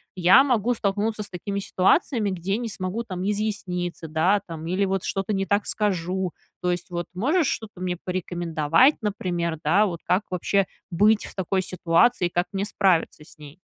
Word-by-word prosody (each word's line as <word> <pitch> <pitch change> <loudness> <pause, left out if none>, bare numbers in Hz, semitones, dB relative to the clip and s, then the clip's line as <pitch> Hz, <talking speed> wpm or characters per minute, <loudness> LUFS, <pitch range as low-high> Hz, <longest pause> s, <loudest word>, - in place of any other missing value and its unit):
Я 185 +7 +7
могу 245 -2 +2
столкнуться 210 0 -1
с 205 - -9
такими 200 +2 -4
ситуациями, 205 - +2
где 185 +1 -2
не 235 -1 -4
смогу 195 +3 -4
там 190 -1 -3
изъясниться, 180 -5 -3
да, 175 +6 +2
там, 165 -2 -7
или 185 +3 +1
вот 195 -1 -1
что-то 195 +2 -2
не 195 -1 0
так 205 +1 +1
скажу. 185 -3 -1 0.3
То 180 - +1
есть, 175 +1 -4
вот, 175 0 -3
можешь 285 - +1
что-то 210 -7 -4
мне 180 -1 -2
порекомендовать, 175 - +2
например, 175 -5 -2
да, 195 +7 +4
вот 175 -5 -4
как 180 +3 +2
вообще 195 +2 +1 0.3
быть 210 +5 +3
в - - -11
такой 190 0 0
ситуации 180 +4 +2
и - - -7
как 175 +1 0
мне 195 0 -1
справиться 185 -7 +1
с 165 - -18
ней? 150 +2 -13
190 Hz, 180 wpm, -24 LUFS, 175-210 Hz, 0.3 s, Я